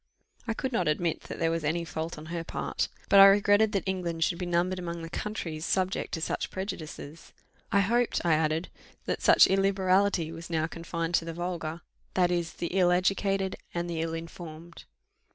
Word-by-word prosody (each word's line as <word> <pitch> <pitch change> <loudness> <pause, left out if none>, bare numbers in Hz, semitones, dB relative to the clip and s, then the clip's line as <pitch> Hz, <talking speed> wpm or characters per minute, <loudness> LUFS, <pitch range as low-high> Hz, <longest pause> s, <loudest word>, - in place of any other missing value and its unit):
I 225 - -1
could 260 +2 -3
not 230 - +1
admit 160 +2 0
that - - -7
there 165 0 +1
was 165 -1 -2
any 170 +3 0
fault 160 0 -4
on 155 - -9
her 170 -1 -2
part; - - -2 0.2
but 200 - +6
I 195 - +12
regretted 205 +2 +4
that 195 -4 0
England 175 -4 -1
should 170 +1 0
be 180 - -3
numbered 175 +2 +1
among 170 -1 -5
the 165 - -7
countries 165 -7 -4
subject 185 +2 0
to 160 - -6
such - - -2
prejudices. 165 -5 -7 0.4
I 200 - +4
hoped, 235 +4 +1
I 170 - +4
added, 155 +2 0 0.4
that - - -2
such - - +7
illiberality 195 -3 +2
was 165 +1 -9
now 160 -2 0
confined 165 0 -4
to 165 - -3
the 165 - -5
vulgar, 170 -2 -4 0.3
that 180 -1 +3
is, 175 -1 -1
the 170 - -4
ill 180 -2 +4
educated 195 +1 +1 0.2
and 170 0 -1
the 165 -2 -2
ill 165 0 -2
informed. 165 0 -9
175 Hz, 190 wpm, -28 LUFS, 165-190 Hz, 0.4 s, I